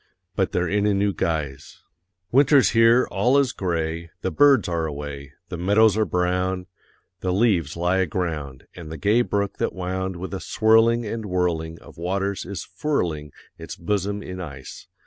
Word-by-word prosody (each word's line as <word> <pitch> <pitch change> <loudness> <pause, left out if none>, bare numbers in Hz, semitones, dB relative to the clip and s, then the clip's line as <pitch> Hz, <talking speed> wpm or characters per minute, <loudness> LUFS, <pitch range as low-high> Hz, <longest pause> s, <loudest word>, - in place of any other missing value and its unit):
But 95 - 0
they're 90 0 0
in 105 +3 +1
a 105 - +2
new 100 0 +1
guise 75 -6 -3 0.5
Winter's 135 -4 +5
here, 115 +2 +5
all 120 +8 +3
is 140 -3 +3
gray, 85 -2 -3
The 95 - -2
birds 135 - +5
are 85 -2 -1
away, 70 -2 -7 0.2
The 85 - -5
meadows 105 +4 +4
are 110 0 +2
brown, 90 +1 -1 0.5
The 90 - -1
leaves 95 - +1
lie 90 +2 +1
aground, 80 -7 -3
And 80 -3 -9
the 80 - -6
gay 105 +10 +3
brook 100 -4 -1
that - - -1
wound 95 0 -3
With 95 +3 -6
a 95 - -3
swirling 115 +1 +3
and 110 0 -4
whirling 85 -3 -1
Of - - -15
waters, 95 +2 -2
is 100 0 -5
furling 85 - -2 0.3
Its - - -7
bosom 100 +3 -2
in 90 0 -7
ice. 70 -6 -9
95 Hz, 165 wpm, -23 LUFS, 85-105 Hz, 0.5 s, Winter's